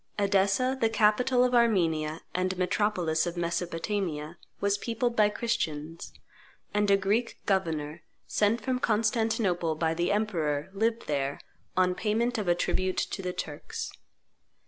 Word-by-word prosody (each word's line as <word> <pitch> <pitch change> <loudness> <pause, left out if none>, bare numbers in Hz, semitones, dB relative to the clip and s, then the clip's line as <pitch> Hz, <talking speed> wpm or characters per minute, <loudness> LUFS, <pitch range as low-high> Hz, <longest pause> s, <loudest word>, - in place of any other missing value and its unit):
Edessa, 200 +5 +2
the 225 - +4
capital 225 +4 +3
of 250 0 +1
Armenia 165 -10 +2
and 185 +1 -1
metropolis 180 -3 +1
of 175 0 -4
Mesopotamia, 170 -1 -2 0.2
was 200 0 +1
peopled 235 +2 -1
by 210 -2 +5
Christians; 165 -9 -3 0.6
and 210 0 +2
a 200 - +6
Greek 210 +5 0
governor, 160 -5 -1 0.2
sent 215 +3 +1
from 255 -2 -1
Constantinople 215 -7 +1
by 160 +1 0
the 175 +3 0
emperor, 170 -8 -1
lived 225 +3 0
there, 140 -1 -1 0.4
on 180 -1 +4
payment 225 +4 0
of 205 - -3
a 175 - +4
tribute 185 +1 0
to - - -2
the 180 -1 -2
Turks. 150 -4 -5
195 Hz, 135 wpm, -28 LUFS, 165-220 Hz, 0.6 s, a